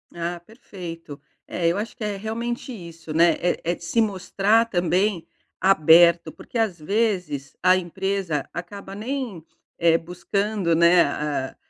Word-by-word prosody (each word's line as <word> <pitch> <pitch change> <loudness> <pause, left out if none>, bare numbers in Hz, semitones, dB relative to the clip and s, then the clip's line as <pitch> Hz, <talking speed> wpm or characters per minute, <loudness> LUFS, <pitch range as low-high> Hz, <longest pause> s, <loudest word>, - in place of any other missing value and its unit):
Ah, 170 +1 -3
perfeito. 170 - -10 0.3
É, 170 - -1
eu 170 +3 +1
acho 215 +3 -4
que 240 - -7
é 210 -1 -2
realmente 235 +5 -4
isso, 165 -7 -9
né. 170 +2 +5
É 175 - 0
é - - -2
de - - -15
se 170 +8 +1
mostrar 205 +2 +2
também 180 -2 0 0.3
aberto, 170 -2 +5
porque 240 - -8
às 215 -7 0
vezes 180 -6 -1
a 185 - +5
empresa 185 -3 -2
acaba 195 +2 -7
nem, 230 - -4 0.3
eh, 165 -1 +4
buscando, 180 +2 -1
né, 170 +1 +6 0.5
eh - - -37
180 Hz, 145 wpm, -23 LUFS, 170-210 Hz, 0.5 s, né